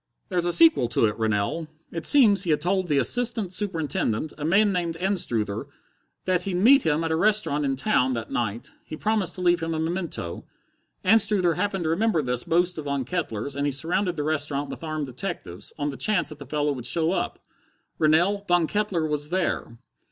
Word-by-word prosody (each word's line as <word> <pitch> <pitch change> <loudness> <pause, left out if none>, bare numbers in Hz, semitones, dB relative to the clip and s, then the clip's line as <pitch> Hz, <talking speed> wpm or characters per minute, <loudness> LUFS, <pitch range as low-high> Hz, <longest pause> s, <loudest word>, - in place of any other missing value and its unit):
"There's 180 -3 0
a 175 - +1
sequel 165 -7 +5
to 115 - +1
it, 105 - 0
Rennell. 110 +9 -1 0.2
It 165 -1 -2
seems 225 -9 +7
he 185 - -1
had 150 - +2
told 185 +2 0
the 145 -3 +1
assistant 220 - +2
superintendent, 160 - -2
a 150 - -8
man 200 +6 +3
named 170 -2 -2
Anstruther, 120 - -2 0.6
that 185 -1 +1
he'd 185 0 -3
meet 250 +9 +5
him 155 +1 +1
at 165 - -2
a - - +2
restaurant 185 -6 +2
in 135 -1 0
town 130 -1 +1
that 115 -2 -5
night. 115 -1 -3
He 155 - -8
promised 215 -2 -1
to 185 - -7
leave 175 -1 +2
him 165 0 -2
a - - -2
memento. 165 - -4 0.6
Anstruther 195 -3 +3
happened 195 +1 -2
to 160 - 0
remember 185 -2 +1
this 125 -1 -1
boast 175 0 +1
of 150 - -7
Von 140 -2 -2
Kettler's, 140 - -4
and 140 +1 -1
he - - 0
surrounded 175 +6 0
the 150 - -3
restaurant 145 -2 -1
with - - -9
armed 155 -2 -3
detectives, 110 -7 -6
on 145 -1 -2
the 135 - -7
chance 215 -1 0
that 155 -2 -10
the 145 - -10
fellow 150 +1 0
would 125 -4 -4
show 160 +5 +1
up. 190 - -2 0.6
Rennell, 175 +6 +2
_Von 175 -2 +3
Kettler 200 -5 -1
was 150 -1 -2
there! 175 -9 -2
165 Hz, 200 wpm, -25 LUFS, 140-185 Hz, 0.6 s, seems